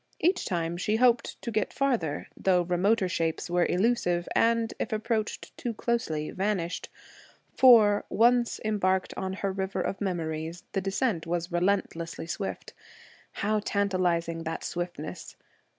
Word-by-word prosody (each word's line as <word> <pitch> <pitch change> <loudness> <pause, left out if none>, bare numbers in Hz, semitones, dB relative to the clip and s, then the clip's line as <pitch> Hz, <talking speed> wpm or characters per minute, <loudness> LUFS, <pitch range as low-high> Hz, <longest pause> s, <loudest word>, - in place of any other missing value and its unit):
Each 360 +2 +2
time, 170 -3 -2
she 210 +4 0
hoped 240 0 +2
to 235 - -3
get 215 -2 0
further, 235 - -1
though 180 -2 +2
remoter 185 +4 +2
shapes 165 0 -2
were 175 0 +3
illusive, 180 -4 +1
and, 230 0 +2
if - - -2
approached 220 0 -2
too 235 -2 -3
closely, 165 -11 -1
vanished, 190 -3 -2 0.7
for, 220 -5 +6
once 240 +1 +3
embarked 190 -3 +1
on 190 0 -3
her 195 0 -2
river 190 0 -3
of 195 - -3
memories, 165 -3 -3
the 195 - -1
descent 195 -2 -1
was 175 +1 -2
relentlessly 175 -2 -1
swift. 195 +4 -5 0.6
How 215 +1 0
tantalizing 180 -5 0
that 165 0 -4
swiftness! 175 -3 -5
190 Hz, 135 wpm, -28 LUFS, 175-215 Hz, 0.7 s, for